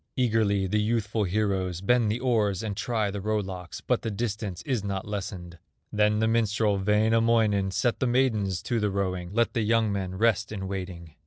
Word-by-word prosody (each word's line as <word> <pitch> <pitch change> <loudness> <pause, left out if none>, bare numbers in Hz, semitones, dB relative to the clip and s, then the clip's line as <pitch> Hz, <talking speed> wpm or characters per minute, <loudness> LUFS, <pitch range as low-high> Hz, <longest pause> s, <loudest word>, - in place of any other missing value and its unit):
Eagerly 110 -6 +2
the 105 +3 +1
youthful 110 -1 0
heroes 95 -2 -1
Bend 115 +3 +2
the 115 - -2
oars 110 -6 +1
and 105 -2 -3
try 110 -1 -1
the 100 0 -5
row 110 +2 0
locks, 95 -4 -6
But - - 0
the - - -3
distance 105 -3 -4
is 125 -7 -1
not 100 -1 -3
lessened. 90 -4 -6 0.3
Then 105 0 +3
the 110 +1 +2
minstrel, 110 -2 +1
Wainamoinen, 110 0 +2
Set 115 +5 0
the 130 - +1
maidens 110 -7 +1
to 120 - -1
the 105 -1 +1
rowing, 95 -3 -2
Let 115 +3 +1
the 115 - 0
young 110 0 +2
men 95 -2 -3
rest 110 0 +1
in 95 -3 -4
waiting. 90 -4 -6
105 Hz, 185 wpm, -27 LUFS, 95-115 Hz, 0.3 s, Then